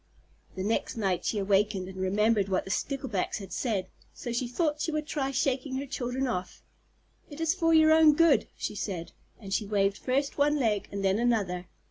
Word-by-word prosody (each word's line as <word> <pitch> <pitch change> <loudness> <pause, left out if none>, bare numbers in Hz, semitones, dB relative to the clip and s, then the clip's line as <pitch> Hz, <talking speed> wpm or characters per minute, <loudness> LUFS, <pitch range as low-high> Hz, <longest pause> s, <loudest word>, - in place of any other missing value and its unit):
The 190 - -3
next 220 +3 -1
night 195 -5 -1
she 220 - 0
awakened 200 -1 +1
and 190 0 -9
remembered 200 +2 +2
what 185 - 0
the 190 - -5
Sticklebacks 265 -4 -2
had 195 -3 -8
said, 210 -7 -1 0.3
so 240 - -5
she 240 +1 -1
thought 300 +4 -1
she 325 - -1
would 305 -1 -2
try 285 -3 -2
shaking 265 0 -1
her 270 +2 -3
children 255 0 -2
off. 185 -8 -4 0.7
"It 290 0 -10
is 325 0 +2
for 335 -3 +1
your 315 -1 +6
own 315 -2 +6
good," 330 -2 +4
she - - -3
said, 185 -5 -4 0.3
and 195 -4 -6
she 210 0 0
waved 200 -1 +1
first 275 +3 -1
one 295 +1 +4
leg 220 -8 0
and 200 -1 -3
then 195 +2 +2
another. 200 -7 0
235 Hz, 195 wpm, -28 LUFS, 195-280 Hz, 0.7 s, your